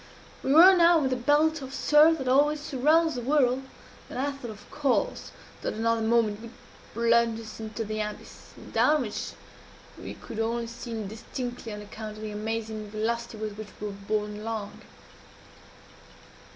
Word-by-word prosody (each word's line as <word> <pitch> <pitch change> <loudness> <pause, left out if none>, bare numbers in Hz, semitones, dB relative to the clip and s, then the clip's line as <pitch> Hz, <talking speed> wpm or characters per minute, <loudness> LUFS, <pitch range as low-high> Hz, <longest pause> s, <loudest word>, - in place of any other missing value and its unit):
We 265 - -1
were 355 +6 +9
now 340 -2 +5
in 265 - +1
the - - +2
belt 295 +5 +2
of 265 0 -7
surf 310 +2 +5
that 265 -3 -5
always 290 +4 +4
surrounds 305 +4 +2
the 245 - -4
whirl; 260 -1 +2 0.5
and - - -7
I 280 +2 0
thought, 275 -4 -8
of 210 -2 -11
course, 295 - 0 0.3
that - - -3
another 230 +1 +1
moment 220 -2 +2
would 230 0 -10 0.4
plunge 230 0 +3
us 220 -1 -9
into 220 +1 -5
the 215 +1 -4
abyss 210 0 -8 0.2
down 300 -2 +4
which 210 -3 -5 0.7
we - - -7
could 225 - -8
only 230 +1 -1
see 235 +1 -9
indistinctly 230 +2 -5
on 210 0 -6
account 215 +1 -8
of 215 - -8
the 215 - -4
amazing 215 0 -4
velocity 225 +2 -2
with 215 -1 -5
which 215 - -6
we 210 - -5
were - - -7
borne 210 +1 -3
along. 215 -2 -5
230 Hz, 165 wpm, -27 LUFS, 215-275 Hz, 0.7 s, were